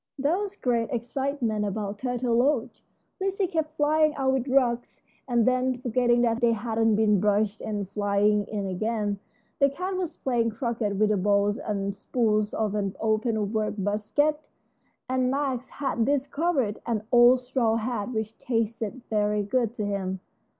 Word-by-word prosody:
There 290 +7 +1
was 405 -1 -4
great 235 - 0
excitement 240 -2 -2
about 205 0 -3
Turtle 245 -2 -1
Lodge. 255 0 +1 0.4
Lizzie 390 +1 0
kept 320 -3 -3
flying 305 0 +3
out 265 -2 +1
with 265 0 -1
rugs, 250 -3 +1 0.3
and 240 -3 +2
then 255 0 +1
forgetting 245 -1 +2 0.2
they 235 -1 +4
hadn't 225 0 +1
been 210 -2 +3
brushed 210 +1 +1
and 205 -2 -3
flying 205 +1 +1
in 205 -2 -3
again. 205 +1 -2 0.4
The 280 -1 +5
cat 365 +7 -4
was 365 -3 -3
playing 240 -3 0
croquet 230 -3 -2
with 210 +2 +2
the 210 - +2
balls 205 +3 +2
and 200 -7 -3
spools 215 -2 0
of 215 -2 -1
an 200 -2 -2
open 220 -1 0
work 215 -1 -1
basket, 215 +10 0 0.7
and 255 0 +1
Max 265 -2 -1
had 270 -5 -1
discovered 280 -3 0
an 220 -3 -1
old 245 +1 +6
straw 245 -3 +1
hat 230 -1 -2
which 220 -1 -3
tasted 230 0 -2
very 210 -1 +1
good 230 +2 0
to 210 - -2
him. 190 -2 -2
230 Hz, 155 wpm, -26 LUFS, 210-260 Hz, 0.7 s, old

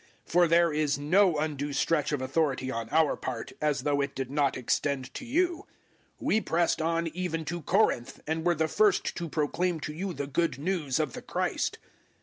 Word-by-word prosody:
010:014 - - -15
For 175 0 +5
there 170 -1 +4
is 150 -1 +1
no 170 +4 +3
undue 145 -1 -2
stretch 150 +2 +1
of 145 -3 -1
authority 135 -2 0
on 115 -2 -4
our 160 -2 +3
part, 120 -3 -5
as 150 -3 +1
though 145 -1 +1
it 140 0 -3
did 135 -1 -4
not 140 -2 +1
extend 130 +1 -1
to - - -6
you. 340 +7 0 0.5
We 220 - +1
pressed 170 -3 +1
on 165 +1 0
even 165 -1 -3
to 175 +3 -4
Corinth, 170 - +1
and 160 +1 -2
were 175 0 +3
the 160 0 +1
first 210 +4 +2
to 170 -2 -4
proclaim 165 +3 0
to 150 - -4
you 185 +5 -3
the 140 - -4
Good 165 +3 0
News 155 -3 -1
of 150 -5 -1
the - - -7
Christ. - - -2
155 Hz, 195 wpm, -28 LUFS, 140-170 Hz, 0.5 s, For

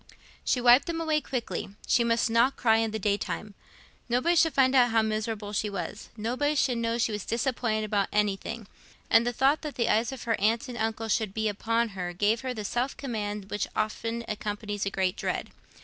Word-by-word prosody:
She 250 - +1
wiped 245 +4 +6
them 335 -1 -2
away 310 -2 +1
quickly: 240 -6 -4
she 240 - +3
must 230 +1 +2
not 235 +4 +3
cry 225 -2 +4
in 225 0 +1
the 220 - -3
day 205 -1 +1
time. 210 0 -5 0.6
Nobody 255 +9 +2
should 325 -3 +3
find 260 -1 +4
out 250 -2 +5
how 225 -1 +3
miserable 215 -1 -3
she 210 +1 0
was, 200 +2 -6
nobody 255 +7 0
should 255 -4 +1
know 230 0 0
she 230 -1 +1
was 210 -2 -3
disappointed 230 -2 -1
about 205 -2 0
anything; 210 +2 -1 0.5
and 230 +1 +5
the - - +2
thought 270 +5 +2
that 300 -2 -6
the 235 -2 0
eyes 225 +3 +2
of 265 - -7
her 230 -1 -1
aunt 225 +5 +2
and 245 -1 -6
uncle 225 0 -1
would 215 -3 -5
be 220 0 0
upon 230 +3 0
her 180 -3 -5
gave 205 +5 +1
her 260 -1 -3
the 215 -4 -5
self 245 +6 -1
command 210 -6 -4
which 205 - -1
often 230 +2 -2
accompanies 205 -1 -3
a - - +1
great 190 -2 0
dread. - - -3
225 Hz, 210 wpm, -28 LUFS, 210-245 Hz, 0.6 s, wiped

